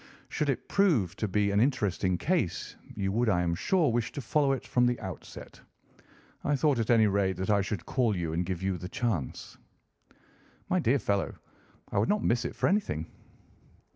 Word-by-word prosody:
Should 150 - -1
it 135 - -2
prove 135 - +2
to 110 - -1
be 100 +1 +1
an 100 - +2
interesting 100 -8 +1
case, 160 - -1 0.2
you 95 -1 -1
would, 115 +3 +1
I 90 -3 +2
am 85 -1 0
sure, 165 - +2
wish 120 -1 -1
to - - -5
follow 140 +1 +2
it 135 - -4
from 125 0 +2
the 120 0 0
outset. 95 -3 -9 0.8
I 145 - +1
thought, 140 -2 +2
at 115 - -1
any 115 -2 +5
rate, 95 -3 +1
that 95 +3 -1
I 100 -1 +4
should 100 -2 -4
call 120 -6 +1
you 85 -2 -2
and 85 +2 0
give 90 0 -4
you 95 -2 -1
the 90 +2 -6
chance." 100 - -3 1.1
"My 185 - +2
dear 140 -4 +3
fellow, 100 -6 -1 0.6
I - - +1
would 105 - +1
not 210 0 +1
miss 120 0 +1
it - - -4
for - - +1
anything." 185 - -1
105 Hz, 195 wpm, -29 LUFS, 95-130 Hz, 1.1 s, any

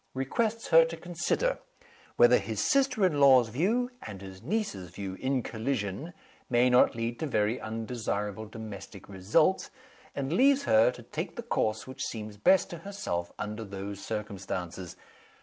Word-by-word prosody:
Requests 220 - -1
her 165 0 +8
to 165 0 -4
consider 175 - -1 0.6
whether - - +6
his - - -4
sister 275 -7 +3
in 155 -6 +1
law's 130 -4 +6
view 220 - 0
and 100 -3 -8
his 95 -1 -10
niece's 135 - -2
view 95 +1 -6
in 130 -2 0
collision, 115 - -3 0.4
may 125 0 +4
not 125 - +5
lead 115 +1 -3
to 160 - -2
very 110 -1 0
undesirable 110 -2 -3
domestic 105 -3 -9
results; 105 - +1 0.5
and 140 +2 -2
leaves 275 +6 +4
her 110 +2 +5
to 125 -1 -8
take 160 - -5
the 235 - -5
course 110 - -1
which 130 0 -9
seems 105 -2 -5
best 185 - +4
to 170 - -6
herself 165 - -4
under 105 +1 -4
those 100 -1 -7
circumstances. 95 -4 -5
120 Hz, 150 wpm, -29 LUFS, 105-165 Hz, 0.6 s, her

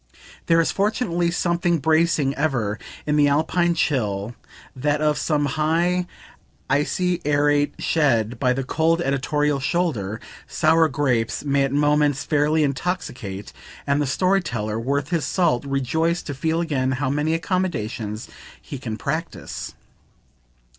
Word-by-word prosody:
There 165 0 +4
is 165 - +2
fortunately 195 -4 0
something 170 0 +1
bracing, 160 -2 +2
ever, 125 -8 -1 0.3
in 150 0 +1
the 145 -1 +5
alpine 170 +4 +2
chill, 110 - -1 0.4
that 145 +3 0
of 150 -1 +2
some 145 0 0
high 165 +5 +1 0.6
icy 175 +5 0
arete, 145 0 +2
shed 120 -7 +1
by 125 -2 +2
the 135 +1 -2
cold 160 +5 +1
editorial 145 0 0
shoulder; 130 - -1 0.3
sour 160 0 +3
grapes 125 -4 0
may 140 -1 +2
at 135 - -3
moments 145 0 +2
fairly 150 +1 +2
intoxicate 135 - -3 0.3
and 140 +1 +1
the 145 - 0
story 185 +8 +2
teller 110 -7 -3
worth 140 +4 -1
his 170 -3 0
salt 160 -8 +1
rejoice 160 +5 0
to 145 - -5
feel 160 +5 -1
again 135 -6 0
how 130 0 -1
many 150 +3 0
accommodations 120 - -2 0.3
he 140 - -8
can 115 -4 -5
practise. 160 +7 -5
145 Hz, 135 wpm, -23 LUFS, 135-165 Hz, 0.6 s, the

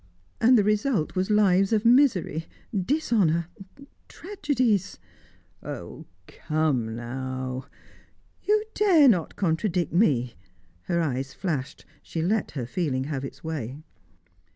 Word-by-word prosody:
"And 245 +2 +5
the 210 - +4
result 210 - 0
was 185 +2 0
lives 195 -2 +3
of 220 0 +1
misery 230 - +3 0.3
dishonour 195 - +1 0.6
tragedies." 255 - -1 0.6
"Oh, - - -8 0.2
come 145 - -1
now 130 +2 -5 0.4
" - - -38
"You 425 +1 +3
dare 355 -9 +5
not 180 - +2
contradict 175 -2 -1
me!" 135 - +2 0.5
Her 170 -1 0
eyes 135 -3 -3
flashed; 150 -8 -4 0.2
she 160 - -4
let 210 +4 0
her 125 - -2
feeling 130 0 -2
have 140 -1 -4
its 135 - -8
way. 145 -6 -4
175 Hz, 115 wpm, -26 LUFS, 135-220 Hz, 0.6 s, And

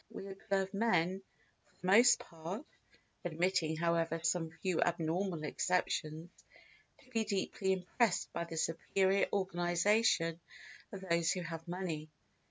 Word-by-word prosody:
We 195 - -8
observe 195 0 -2
men 195 -4 +1 0.5
for - - -31
the - - -9
most 235 +6 +7
part 170 - -7 0.6
(admitting 175 -1 0
however 165 0 +1
some 165 0 +1
few 185 -4 +1
abnormal 170 0 0
exceptions) 160 0 -1 0.7
to 255 - -22
be 225 -2 +1
deeply 190 -1 0
impressed 190 +3 0
by 170 - -2
the 165 -1 -7
superior 190 +4 +1
organisation 175 -1 +2 0.5
of 195 - -7
those 170 -3 +1
who 185 - -3
have 165 -1 -6
money. 170 -4 -4
180 Hz, 125 wpm, -34 LUFS, 165-195 Hz, 0.7 s, most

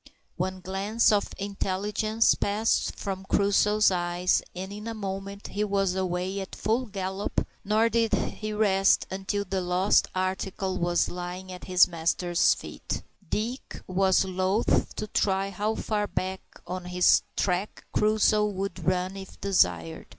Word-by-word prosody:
One 185 +1 -3
glance 200 +5 +1
of 205 -1 +1
intelligence 205 +3 +1
passed 210 +2 0
from 190 -1 -4
Crusoe's 205 +1 +3
eye, 175 0 -2 0.3
and 190 +2 -5
in 210 +2 -7
a 230 - -4
moment 200 0 -5
he 205 - -1
was 195 -2 +1
away 185 +1 -2
at 190 - -6
full 235 +4 0
gallop, 190 0 -2 0.2
nor 215 +3 +3
did 230 -1 +1
he 215 0 -2
rest 195 -2 +3
until 195 +1 -2
the 190 0 -1
lost 180 +2 +3
article 185 0 -2
was 175 0 +2
lying 180 +1 -6
at 180 - -8
his 180 -1 +5
master's 170 +1 +2
feet. - - -6 0.3
Dick 235 +5 -3
was 190 0 +3
loath 190 +3 +1
to - - -3
try 195 -1 0
how 210 +3 -1
far 210 -1 -1
back 190 0 -3 0.2
on 180 +1 -5
his 180 0 +4
track 185 +2 -1
Crusoe 215 0 +3
would 195 -2 -4
run 185 +1 0
if 195 -1 -10
desired. 90 - +1
195 Hz, 145 wpm, -27 LUFS, 185-210 Hz, 0.3 s, his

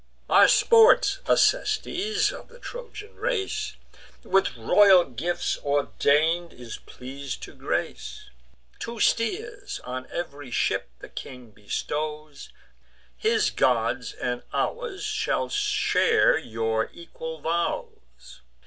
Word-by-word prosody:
Our - - +8
sports 460 -3 +5
Acestes, 425 -3 +2
of - - -10
the 480 - -16
Trojan 465 -3 -9
race, 430 -2 -2 0.5
With 190 -9 +1
royal 185 - +6
gifts 150 +8 -2
ordain'd, 150 +4 +1
is 120 -2 -9
pleas'd 135 +1 -7
to - - -9
grace: - - -4 0.5
Two 230 0 -6
steers 435 - -1
on 130 +1 -6
ev'ry 145 -5 -6
ship 110 - 0
the - - -9
king 125 -3 -9
bestows; 150 +8 -5 0.7
His 440 -1 +1
gods - - +1
and - - -3
ours 465 -5 -2
shall 430 +1 -1
share 420 +1 +3
your 110 -5 -1
equal 160 -1 -8
vows. 65 - -4
175 Hz, 105 wpm, -25 LUFS, -, 0.7 s, Our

